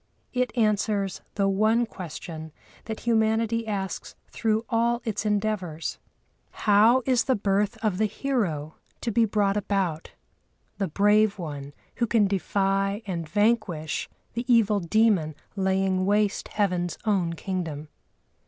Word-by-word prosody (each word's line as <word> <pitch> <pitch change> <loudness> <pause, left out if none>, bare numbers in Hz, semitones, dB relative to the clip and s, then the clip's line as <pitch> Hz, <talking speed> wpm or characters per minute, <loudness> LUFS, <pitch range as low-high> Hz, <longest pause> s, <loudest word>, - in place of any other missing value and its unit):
It 250 -2 0
answers 210 -3 +1
the 200 -1 +2
one 215 +4 +3
question 160 -5 -8 0.3
that 220 -1 -5
humanity 225 0 +1
asks 195 -3 -4 0.2
through 220 0 0
all 235 +1 +1
its 220 -1 -2
endeavours: 200 -6 -2 0.7
"How 220 +5 +5
is 255 -3 +2
the 260 - +2
birth 200 0 0
of 200 -3 0
the 215 - +3
hero 195 - -2 0.2
to 235 - -1
be 230 +2 +4
brought 205 -1 +1
about, 190 -6 -1 0.7
the 195 - 0
brave 210 +4 +3
one 145 -5 -6 0.3
who 235 - +1
can 220 -2 +3
defy 195 +2 0
and 170 -5 -4
vanquish 205 -6 0 0.2
the 240 +2 -2
evil 215 -3 +4
demon 185 -4 +2 0.2
laying 190 -1 +1
waste 205 0 +1
heaven's 180 -4 -1
own 190 -6 +1
kingdom?" 165 -4 -4
205 Hz, 125 wpm, -26 LUFS, 185-220 Hz, 0.7 s, How